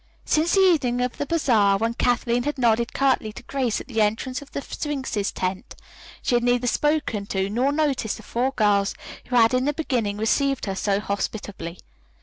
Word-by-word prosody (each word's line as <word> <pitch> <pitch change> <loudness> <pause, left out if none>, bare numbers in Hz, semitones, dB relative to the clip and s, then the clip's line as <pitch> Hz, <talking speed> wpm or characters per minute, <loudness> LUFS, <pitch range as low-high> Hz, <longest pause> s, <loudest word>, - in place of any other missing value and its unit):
Since 320 +4 +2
the 390 - +5
evening 290 -10 +3
of 250 0 -2
the 290 - -2
bazaar, 225 -12 +3
when 225 +3 -1
Kathleen 245 0 +1
had 295 +3 -3
nodded 235 -1 +2
curtly 265 -5 +1
to - - -10
Grace 255 -4 -1
at - - -10
the 225 -4 0
entrance 230 +5 0
to 285 - -11
the - - -3
Sphinx's 265 -9 -3
tent, 185 +1 -4 0.5
she - - 0
had 240 0 +3
neither 245 0 +2
spoken 270 -6 0
to 195 0 -1
nor 250 +6 +1
noticed 285 -7 0
the 220 - -12
four 245 +5 0
girls 205 -4 +2 0.3
who 250 - -2
had 230 0 +5
in 255 +1 +2
the 295 - +1
beginning 245 -10 -1
received 275 +5 +1
her 195 - -2
so 195 +1 0
hospitably. 200 -4 -4
240 Hz, 190 wpm, -24 LUFS, 210-275 Hz, 0.5 s, the